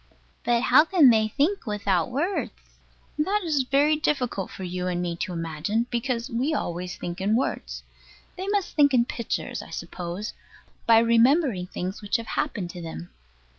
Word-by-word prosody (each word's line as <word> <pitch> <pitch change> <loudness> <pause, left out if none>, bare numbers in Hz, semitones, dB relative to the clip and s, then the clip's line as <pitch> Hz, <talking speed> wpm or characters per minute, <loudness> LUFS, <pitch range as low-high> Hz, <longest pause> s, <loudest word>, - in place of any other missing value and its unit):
But 240 0 +2
how 265 +4 +7
can 325 -6 +6
they 220 -1 +3
think 290 - 0
without 200 -3 0
words? 320 +10 -3 0.4
That 390 +7 +1
is 305 -5 +1
very 290 +3 +4
difficult 255 -10 -1
for 190 - -8
you 180 0 -3
and 180 -1 -1
me 175 -1 -2
to 180 - -3
imagine, 165 +7 -2
because 240 0 -1
we 270 +5 -1
always 180 -5 -3
think 175 +2 -5
in 205 +3 +2
words. 255 - -2 0.5
They 375 +1 -5
must 405 -2 -1
think 285 -3 +5
in 235 -1 +4
pictures, 235 -1 -3
I - - -12
suppose, 180 +4 -5 0.5
by 230 -1 +7
remembering 230 - +3
things 185 +3 -5
which 205 - -2
have 230 - -7
happened 195 -11 -2
to 175 - -8
them. 90 - -7
230 Hz, 170 wpm, -25 LUFS, 180-285 Hz, 0.5 s, how